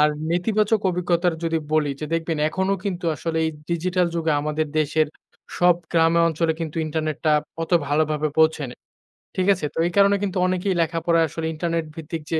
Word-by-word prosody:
আর 150 - +6 0.2
নেতিবাচক 210 +4 +1
অভিজ্ঞতার 175 -1 +1
যদি 165 0 +1
বলি 155 -2 +2
যে 155 - -3
দেখবেন 165 0 -1
এখনো 190 +4 0
কিন্তু 180 -3 -3
আসলে 165 0 -2
এই 160 - +1 0.2
ডিজিটাল 180 +1 +1
যুগে 165 -2 0
আমাদের 150 +1 -1
দেশের 155 +1 +1 0.5
সব 175 -1 +5 0.2
গ্রামে 165 0 +4
অঞ্চলে 160 0 0
কিন্তু 165 0 -4
ইন্টারনেটটা 155 0 -1 0.3
অত 165 - -5 0.2
ভালোভাবে 155 +1 +1
পৌঁছেনি। 155 -5 +2 0.6
ঠিক 185 0 0
আছে? 170 -5 -4
তো - - -12
এই - - -3
কারণে 200 0 +5
কিন্তু 195 -2 -2
অনেকেই 185 +1 0
লেখাপড়ায় 165 0 +2
আসলে 160 +2 -5
ইন্টারনেট 165 0 -2
ভিত্তিক 160 0 -6
যে 160 - +2
165 Hz, 170 wpm, -23 LUFS, 155-180 Hz, 0.6 s, আর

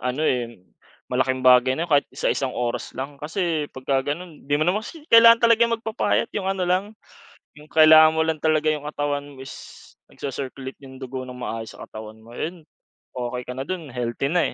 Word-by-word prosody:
Ano, 125 +5 -2
eh, 120 -5 -1 0.6
malaking 130 0 0
bagay 125 0 +6
na 165 - -1
'yon 170 - -11
kahit 145 - +4
isa-isang 130 -2 -1
oras 120 -1 -3
lang. 140 +2 -6
Kasi 160 -1 -2
pagka 135 +1 -1
gano'n 165 -3 -10
'di 145 - +2
mo 155 - +1
naman 185 +5 +1
kasi 300 +7 -11
kailangan 230 0 +8
talaga 230 0 +4
magpapayat, 225 0 -1
yung 190 -2 -2
ano 195 -1 -1
lang, 180 +2 +1 0.7
yung 150 - -14
kailangan 155 0 +7
mo 160 - +2
lang 160 -1 -1
talaga 155 0 +2
yung 150 -1 -3
katawan 145 -1 -2
mo 130 - -11
is 135 - -9 0.6
nagsi-circulate 135 -1 -6
yung 130 0 -12
dugo 130 0 -6
ng 125 0 -9
maayos 115 -2 -6
sa - - -11
katawan 110 0 -10
mo, 115 +1 -15
'yon 170 +1 -5 0.5
okey 125 0 -4
ka 125 - -6
na 135 - -4
do'n, 170 -5 -5
healthy 120 +2 -2
na, 175 +2 +2
145 Hz, 195 wpm, -23 LUFS, 130-170 Hz, 0.7 s, kailangan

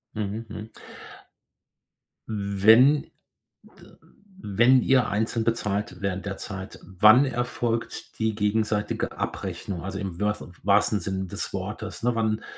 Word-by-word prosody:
Mhm, 105 +2 -3
mhm. 110 +1 -8 1.6
Wenn 110 +7 +4 1.3
wenn 120 +6 +4
ihr 130 -2 +3
einzeln 110 +2 -1
bezahlt 105 -3 -2
während 95 -1 -2
der 100 -1 -3
Zeit, 95 -2 -7
wann 110 +8 +5
erfolgt 120 -2 -3
die 110 -1 0
gegenseitige 105 0 -1
Abrechnung, 90 -3 -5
also, 95 +1 -5
im 95 -3 -5
wört 105 0 -1 0.2
wahrsten 105 +1 +3
Sinne 95 +1 -3
des - - -5
Wortes, - - -5
ne? 120 -1 +1
Wann 110 -1 0
105 Hz, 115 wpm, -25 LUFS, 100-115 Hz, 1.6 s, wann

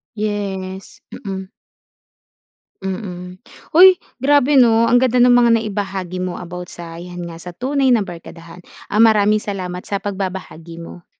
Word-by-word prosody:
Yes, 195 -3 -5
mm. 190 -1 -6 1.3
Mm. 185 -2 -6 0.3
Hoy, 370 +3 +8 0.2
grabe 285 +1 +4
'no, 230 -2 +5
ang 245 +1 +4
ganda 255 -1 +1
nung 245 0 +6
mga 235 -1 +4
naibahagi 195 -4 -3
mo 180 -1 -3
about 180 0 -8
sa 170 -1 -10
yan 175 0 -8
nga, 165 -1 -8
sa 175 0 -10
tunay 270 +3 0
na 220 - +1
barkadahan. 170 -1 -11 0.3
Ah, 210 - +1
maraming 215 -1 +4
salamat 185 -3 -5
sa 200 -1 -3
pagbabahagi 185 -4 -5
mo. 175 +1 -12
195 Hz, 140 wpm, -19 LUFS, 180-225 Hz, 1.3 s, Hoy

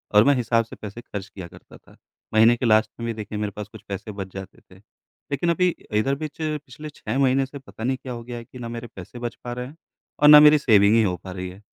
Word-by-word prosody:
और 105 - +8
मैं 145 - +5
हिसाब 115 -1 +1
से - - -11
पैसे 105 +2 -7
खर्च 100 -4 -7
किया 95 -3 -9
करता - - -16
था। - - -22 0.4
महीने 115 +2 +6
के 125 - -2
लास्ट 110 -1 +4
में 115 - -4
भी 115 - -2
देखिए 105 -1 -6
मेरे 105 -1 -2
पास 105 -1 -6
कुछ - - -12
पैसे 100 +2 -6
बच 100 -2 -6
जाते 95 0 -9
थे, 95 - -20 0.6
लेकिन 155 +5 0
अभी 180 +2 +3 0.3
इधर 135 +5 +1
बीच 155 +1 -7
पिछले 150 -1 -5
6 110 +5 -4
महीने 135 0 +3
से 140 +2 -10
पता 130 -4 -11
नहीं 130 +2 0
क्या 130 -2 -7
हो 115 -1 -7
गया 120 0 -7
है 115 - -7
कि 125 - -13
ना 120 -1 -6
मेरे 120 0 -6
पैसे 95 +6 -10
बच 120 -1 -4
पा 120 - -4
रहे 125 0 -5
हैं 145 - -13 0.4
और 150 - +6
ना 150 0 +11
मेरी 150 0 +8
सेविंग 110 -7 +4
ही 115 - +5
हो 90 -4 0
पा 95 - -7
रही 90 0 -5
है। 95 +3 -13
115 Hz, 270 wpm, -23 LUFS, 105-135 Hz, 0.6 s, ना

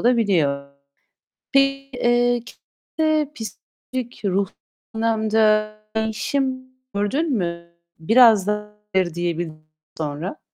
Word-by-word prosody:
olabiliyor. 175 - +2 0.8
Peki, 275 0 +2
eee, 240 0 +3 0.6
kendinde 310 -2 +2
psikolojik, 240 +2 -7
ruhsal 195 0 0 0.4
anlamda 220 -1 +2 0.2
değişim 255 +4 -1 0.2
gördün 265 +10 0
mü 170 -1 -4 0.2
biraz 220 +1 +6
daha 210 0 -2 0.2
hayır 185 -3 +2
diyebildikten 170 -2 -3 0.3
sonra. 155 +4 -4
215 Hz, 85 wpm, -22 LUFS, 175-250 Hz, 0.8 s, biraz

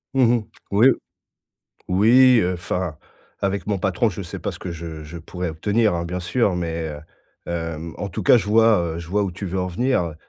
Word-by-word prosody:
Mmh 130 - +4
mh, 115 - -2 0.3
oui 110 +6 +6 1.0
oui, 120 +6 +6
heu, 90 -1 0
enfin 90 -3 -3 0.4
avec 100 0 -1
mon 100 -2 0
patron, 95 +4 +1
je 95 +2 -6
sais 85 - -7
pas - - -2
ce - - -10
que 90 - -6
je 80 -1 -7
je 80 +3 -9
pourrais 90 +1 -5
obtenir, 105 +6 +1
hein, 85 0 -2
bien 90 +2 -3
sûr, 90 +2 0
mais, 85 -2 -3
heu, 75 -1 -7 0.5
hem 85 -1 -4
en 100 - -3
tout 90 - -5
cas - - +7
je 105 - 0
vois, 110 -1 +5 0.2
heu, - - -5
je 85 - -8
vois 100 +4 0
où 100 - -1
tu 95 +3 -6
veux 95 +1 -2
en 90 - -2
venir, 120 +4 +1
heu. 85 -2 -5
90 Hz, 220 wpm, -22 LUFS, 85-105 Hz, 1.0 s, cas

